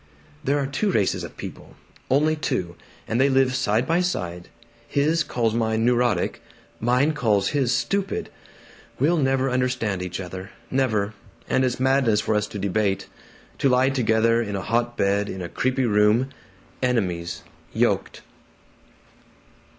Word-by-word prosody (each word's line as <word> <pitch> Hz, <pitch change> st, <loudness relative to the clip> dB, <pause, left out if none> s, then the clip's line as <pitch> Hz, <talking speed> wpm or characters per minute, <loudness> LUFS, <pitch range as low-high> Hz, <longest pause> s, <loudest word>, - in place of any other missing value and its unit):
"There 140 Hz, +1 st, +1 dB
are 140 Hz, -, 0 dB
two 140 Hz, +10 st, -1 dB
races 95 Hz, -, +1 dB
of 85 Hz, -, -9 dB
people, -, -, -9 dB, 0.3 s
only 150 Hz, +4 st, +3 dB
two, 110 Hz, -, -2 dB, 0.3 s
and 115 Hz, +3 st, +1 dB
they 140 Hz, -, +4 dB
live 130 Hz, -1 st, +3 dB
side 115 Hz, 0 st, +1 dB
by 165 Hz, +2 st, +2 dB
side. 90 Hz, -, -3 dB, 0.4 s
His 155 Hz, +3 st, +2 dB
calls 115 Hz, -5 st, 0 dB
mine 110 Hz, -1 st, +1 dB
'neurotic'; 120 Hz, -6 st, +1 dB, 0.4 s
mine 125 Hz, +6 st, +2 dB
calls 105 Hz, -8 st, +1 dB
his 135 Hz, -5 st, +1 dB
'stupid.' 195 Hz, +8 st, -1 dB, 0.7 s
We'll 160 Hz, +6 st, +3 dB
never 135 Hz, -2 st, +2 dB
understand 125 Hz, -6 st, 0 dB
each 90 Hz, 0 st, -4 dB
other, 95 Hz, +1 st, -7 dB, 0.2 s
never; 110 Hz, -6 st, +1 dB, 0.3 s
and 130 Hz, -, +2 dB
it's 125 Hz, -1 st, 0 dB
madness 130 Hz, -5 st, +3 dB
for 110 Hz, -, 0 dB
us 105 Hz, 0 st, +1 dB
to 105 Hz, -, -7 dB
debate 100 Hz, 0 st, -1 dB, 0.5 s
to 135 Hz, -, +3 dB
lie 130 Hz, +1 st, +4 dB
together 115 Hz, -2 st, +2 dB
in 105 Hz, -3 st, -3 dB
a 95 Hz, -, -2 dB
hot 120 Hz, +2 st, 0 dB
bed 100 Hz, +1 st, +1 dB
in 95 Hz, -, -5 dB
a -, -, -4 dB
creepy 130 Hz, 0 st, 0 dB
room 105 Hz, +4 st, +3 dB, 0.5 s
enemies, 90 Hz, -9 st, -1 dB, 0.3 s
yoked." -, -, 0 dB
120 Hz, 145 wpm, -24 LUFS, 105-135 Hz, 0.7 s, they